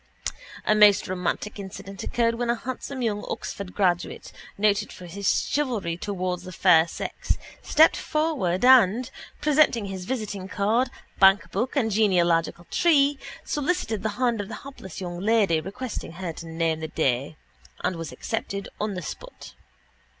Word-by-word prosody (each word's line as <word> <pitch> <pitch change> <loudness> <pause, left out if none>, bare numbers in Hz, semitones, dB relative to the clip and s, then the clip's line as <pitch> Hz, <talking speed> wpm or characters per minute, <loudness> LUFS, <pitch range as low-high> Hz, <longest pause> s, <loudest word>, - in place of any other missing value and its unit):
A - - +4
most 210 -2 +6
romantic 185 +3 -3
incident 195 0 -8
occurred 230 -1 +1
when 235 +1 -2
a 235 - +3
handsome 260 +2 -5
young 210 -2 -1
Oxford 190 +2 -5
graduate, 180 -3 0 0.3
noted 210 0 +2
for 180 - -10
his 195 +3 0
chivalry 235 - -1
towards 180 -1 -3
the 185 0 -9
fair 170 -2 +5
sex, - - -3 0.2
stepped 315 +2 +5
forward 270 - 0
and, 250 -2 +6 0.3
presenting 295 -7 +3
his 190 -2 -6
visiting 210 -6 -4
card, 220 +6 +1 0.3
bankbook 200 +5 +4
and 230 -6 +1
genealogical 175 -5 +2
tree, 285 -4 +3 0.3
solicited 295 - -1
the 220 - -1
hand 240 -4 +1
of 200 - -7
the 215 0 -8
hapless 225 -10 -9
young 175 -1 -5
lady, 200 -5 +3
requesting 205 0 -6
her 175 -1 -5
to 165 - -9
name 165 -1 -1
the 160 - -4
day, 140 -1 -1 0.5
and 185 - 0
was 165 -2 -6
accepted 200 +9 -4
on 210 -1 -2
the 185 - -5
spot. - - -9
200 Hz, 150 wpm, -25 LUFS, 180-240 Hz, 0.5 s, most